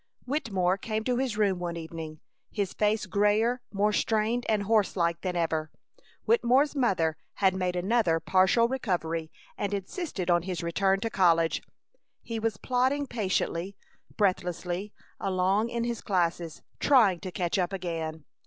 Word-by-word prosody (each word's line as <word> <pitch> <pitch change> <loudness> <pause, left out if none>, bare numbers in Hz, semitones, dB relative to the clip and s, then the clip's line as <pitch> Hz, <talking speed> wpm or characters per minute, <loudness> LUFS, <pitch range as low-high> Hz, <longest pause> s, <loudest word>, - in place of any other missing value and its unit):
Wittemore 200 -10 0
came 220 +1 -2
to 245 +1 0
his 250 -5 -1
room 200 -4 +2
one 170 -1 -3
evening, 160 -1 -7 0.3
his 200 -3 -2
face 210 +1 +1
grayer, 215 +4 +2
more 210 +1 +1
strained 225 +3 0
and 215 -2 +2
horse 215 -1 +2
like 170 -2 0
than 180 -2 -2
ever. 160 -2 -1 0.6
Wittemore's 290 - +3
mother 175 - +1 0.2
had 190 -2 +3
made 180 -1 -1
another 180 -2 +2
partial 190 +7 +3
recovery 170 -10 -2 0.3
and 205 0 -1
insisted 200 - -4
on 175 0 +4
his 180 -1 -4
return 190 +3 +1
to 225 0 -2
college. 165 -4 +3 0.6
He 230 -1 -4
was 220 -2 -1
plodding 260 +5 +1
patiently, 195 -5 -2 0.4
breathlessly 185 0 -1 0.3
along 195 +4 +1
in 235 0 -2
his 235 -1 -3
classes, 170 -3 -1 0.2
trying 220 -11 +4
to 185 - -6
catch 180 +1 -1
up 180 0 0
again. 165 -5 -4
195 Hz, 145 wpm, -28 LUFS, 175-225 Hz, 0.6 s, on